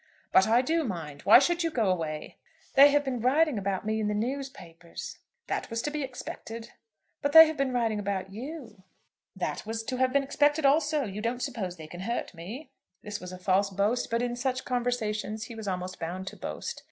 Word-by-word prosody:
"But 190 - +5
I 235 +3 +4
do 325 +4 +1
mind. 160 - -5
Why 205 - +10
should 345 +6 +2
you 330 - +1
go 230 -9 0
away?" 155 -4 -4 0.4
"They 280 +1 +9
have 290 0 +3
been 260 -3 -2
writing 275 0 +3
about 195 0 -2
me 220 0 0
in 215 - 0
the 210 - 0
newspapers." 225 -9 -5 0.3
"That - - -3
was 230 -1 -2
to 295 - -2
be 300 0 -3
expected." 230 -3 -7 0.5
"But 285 0 0
they 320 0 +12
have 315 0 -2
been 275 -2 0
writing 230 -4 0
about 195 -1 -3
you." 250 -2 -8 0.5
"That - - -3
was 225 +1 -4
to 255 +3 -3
have 260 0 +2
been 280 +1 +3
expected 290 +2 +2
also. 300 +1 +3
You 210 -2 -5
don't 240 +2 -2
suppose 200 -10 -4
they 160 - -9
can 175 +3 -10
hurt 235 +4 -3
me?" 225 - -8 0.3
This 210 0 -5
was 180 0 -8
a 185 - -7
false 190 +2 +2
boast, 200 +5 0
but 230 +1 0
in 240 0 -1
such 255 +1 -2
conversations 220 -4 -1
he 230 - -8
was 220 -2 -7
almost 185 -1 -3
bound 180 +3 -4
to - - -13
boast. - - -5
230 Hz, 210 wpm, -28 LUFS, 195-275 Hz, 0.5 s, they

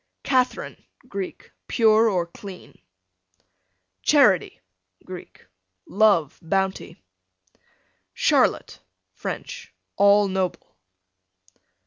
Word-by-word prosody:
Catherine, 255 -2 -1 0.2
Greek, 195 -5 -7 0.2
pure 220 -1 +4
or 180 -4 0
clean, 185 +2 -12 1.2
Charity, 250 - +3 0.5
Greek, 185 -1 -11 0.4
love, 200 -8 +2
bounty. 190 +3 -2 1.2
Charlotte, - - +1 0.3
French, - - -7 0.3
all 200 +1 +5
noble. 190 - -3
195 Hz, 65 wpm, -23 LUFS, 185-220 Hz, 1.2 s, all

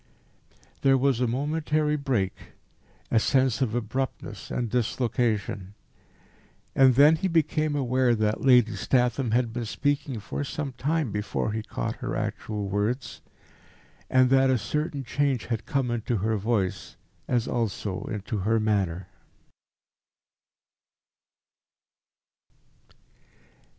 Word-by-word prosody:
There 135 -1 +5
was 130 -2 +1
a 125 - +2
momentary 150 +4 0
break, 125 -10 -1 0.8
a 115 - +5
sense 130 +1 +2
of 120 -3 0
abruptness 120 +3 -4
and 120 - -2
dislocation. 110 -4 -1 1.0
And 130 -2 +5
then 150 +4 +6
he 190 - -1
became 155 -3 +1
aware 130 -2 +2
that 110 -1 0
Lady 125 -5 +5
Statham 125 +4 +1
had 120 0 +1
been 120 -1 -3
speaking 140 +1 -1
for 110 - -4
some 140 0 -4
time 145 +1 -1
before 105 +1 -2
he 110 +1 -2
caught - - -4
her - - -4
actual 105 -2 -3
words, 105 +7 -2 0.9
and 130 0 +4
that 135 0 +5
a 130 - +3
certain 145 +6 -2
change 135 -2 0
had 115 -3 -3
come 135 -5 0
into 120 0 -1
her 110 +3 0
voice 105 -3 -2 0.3
as 120 -2 0
also 105 -5 -2
into 105 0 -4
her 110 +4 +1
manner. 95 -5 0
120 Hz, 115 wpm, -26 LUFS, 110-135 Hz, 1.0 s, then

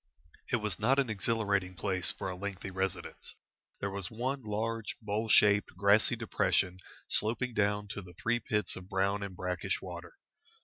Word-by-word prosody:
It - - +4
was 105 -6 -2
not 125 +5 +3
an 135 -5 +2
exhilarating 100 -3 0
place 95 0 0
for - - -5
a 95 - -3
lengthy 100 0 -5
residence. 95 0 -4 0.4
There 100 - -2
was 100 0 -3
one 130 +4 -2
large, 110 0 -2
bowl 110 0 -2
shaped, 105 -3 +5
grassy 100 +5 +4
depression 95 -4 +1 0.3
sloping 120 +3 +1
down 105 -1 +1
to 100 - -4
the 90 -2 -12
three 120 +6 0
pits 105 -3 -1
of 95 0 -9
brown 100 +2 +1
and 100 -2 -5
brackish 90 -1 -2
water. - - -8
105 Hz, 165 wpm, -32 LUFS, 95-110 Hz, 0.4 s, shaped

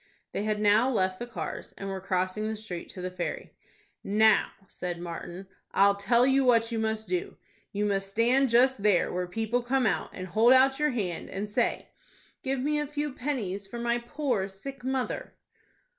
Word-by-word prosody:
They 205 - -2
had 215 -1 0
now 210 +4 +4
left 185 -6 0
the 240 - -5
cars, 240 - -6
and 195 - -6
were 190 -1 -4
crossing 185 +2 -1
the 220 - -2
street 210 -5 -7
to 185 - -8
the 185 - -3
ferry. 180 -1 -5 0.5
"Now," 215 +1 +4 0.2
said 175 -1 -5
Martin, 175 +2 -7 0.3
"I'll 200 0 +5
tell 235 +5 +3
you 270 +1 +4
what 230 -2 +3
you 225 - -1
must 220 0 -1
do. 365 +2 -3 0.3
You 205 +1 -1
must 195 -1 0
stand 245 +6 +3
just 245 0 +4
there 205 -3 +3
where 180 0 -2
people 225 +6 -1
come 255 +1 +1
out, 205 - 0
and 185 - -6
hold 220 +7 +5
out 265 +1 +5
your 300 0 +3
hand, 200 - -3
and 200 +2 -4
say, 210 - -1 0.5
'Give 270 0 -1
me 295 +2 +1
a 295 - -2
few 295 -1 -3
pennies 215 -8 -2
for 235 - -7
my 235 0 0
poor 240 -5 -1
sick 250 +7 -9
mother.'" 260 -1 -2
220 Hz, 190 wpm, -28 LUFS, 195-255 Hz, 0.5 s, I'll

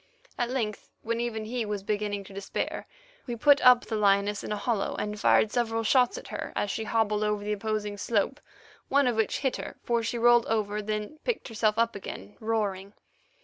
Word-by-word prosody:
At 240 -2 -1
length, 225 -5 -3
when 230 +1 -1
even 225 -2 -2
he 240 +2 -2
was 205 -2 -4
beginning 205 -1 -2
to 195 - -13
despair, 195 0 -4 0.4
we 240 - -3
put 285 +4 +5
up 250 -1 +7
the 225 - -3
lioness 200 0 +2
in - - -5
a 210 - -1
hollow, 215 -1 -1
and 210 0 -3
fired 215 - +4
several 225 -1 0
shots 250 +2 +3
at - - -9
her - - -5
as 205 - 0
she 220 - -3
hobbled 215 -2 +1
over 210 -1 0
the 210 +1 -1
opposing 210 -1 -3
slope, 225 +6 0 0.5
one 280 0 +4
of 245 -2 +1
which 220 -2 +1
hit 265 -2 0
her, - - -7
for 235 -1 +1
she 230 +2 -2
rolled 240 0 +5
over, 210 -1 0
then 215 +7 -4
picked 480 - -2
herself 215 -1 +1
up 230 -1 +2
again, 105 - -8
roaring. 205 -3 -2
215 Hz, 200 wpm, -28 LUFS, 205-235 Hz, 0.5 s, up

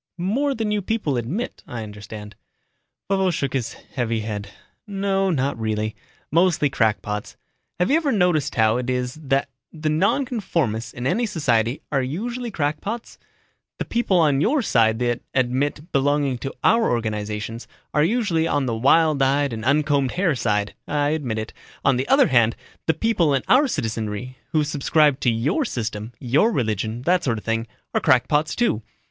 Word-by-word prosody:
"More 260 +11 0
than 220 -2 -1
you 210 -1 +1
people 200 -9 -1
admit, 130 - -3
I 120 -2 -5
understand." 105 0 -9 0.7
Vovo 190 -1 +2
shook 140 -5 -2
his 130 -4 -2
heavy 115 -3 -3
head. 105 -2 -5 0.4
"No, 195 -1 0
not 140 -6 0
really. 110 -1 -2 0.4
Mostly 165 -3 +3
crackpots. 105 -3 -1 0.4
Have 180 +8 +1
you 300 - +5
ever 310 -4 0
noticed 180 - +2
how 110 -1 +3
it 125 0 -3
is 125 0 -1
that 135 -1 0 0.2
the 155 -1 -2
nonconformists 165 - 0
in 120 - -6
any 225 - +1
society 120 - 0
are 140 -2 +2
usually 235 - -3
crackpots? 200 +7 -3 0.6
The - - -3
people 230 -5 +1
on 145 -5 +3
your 265 - +2
side 110 - +3
that 120 -1 0
admit 140 +5 0
belonging 140 -2 +1
to 135 - -5
our 230 0 +4
organizations, 110 0 -3 0.3
are 150 - +3
usually 175 -5 +1
on 145 -3 +1
the 120 - -1
wild 150 +5 +4
eyed 140 0 +2
and 110 0 -5
uncombed 140 -1 +2
hair 180 -3 +2
side 105 -5 0
I 145 -1 +1
admit 140 -8 -2
it. 110 0 -5 0.3
On 135 -2 +4
the 130 - -2
other 270 -2 +5
hand, 115 -3 +4 0.3
the 160 - +3
people 175 -11 +2
in 135 - -1
our 275 +3 +5
citizenry 115 - -3
who 155 -1 +2
subscribe 150 -1 +2
to 125 - +2
your 125 - +1
system, 115 - -4
your 140 - +2
religion, 110 - -1
that 180 +3 +2
sort 115 -4 0
of 105 - -8
thing, 115 0 -1 0.3
are - - +1
crackpots, 150 +4 +2
too. 235 - +1
140 Hz, 165 wpm, -23 LUFS, 115-180 Hz, 0.7 s, you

